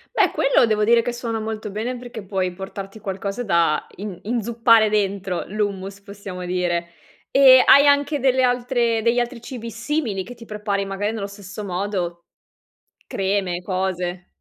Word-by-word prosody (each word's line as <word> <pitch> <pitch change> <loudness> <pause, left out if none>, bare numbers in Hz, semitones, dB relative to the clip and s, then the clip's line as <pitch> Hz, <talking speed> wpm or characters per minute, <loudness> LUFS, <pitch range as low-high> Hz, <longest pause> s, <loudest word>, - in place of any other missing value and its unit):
Beh, - - +4
quello - - +3
devo 215 -1 +1
dire 230 +2 +5
che 245 - -2
suona 235 -2 -3
molto 215 -1 -5
bene 230 +5 -3
perché 240 -4 -8
puoi 190 -2 -2
portarti 195 +2 -8
qualcosa 200 +3 -4
da 170 -6 +1
in 195 -3 -7
inzuppare 230 0 +3
dentro 195 -3 -1
l'hummus, 200 -1 -3
possiamo 200 -2 -8
dire. 175 -1 -1 0.4
E 260 -2 +8
hai 280 +1 +7
anche 285 +1 +3
delle 260 -1 +3
altre 245 -2 +1
degli 235 +2 +2
altri 240 0 -1
cibi 235 -2 -7
simili, 230 -4 -2
che 245 - -10
ti 230 -1 -13
prepari 210 -2 -2
magari 200 +2 -2
nello 215 -3 -4
stesso 200 0 -9
modo? 180 -2 -3 0.8
Creme, 190 -2 -1
cose? 180 -1 -3
210 Hz, 155 wpm, -22 LUFS, 190-235 Hz, 0.8 s, E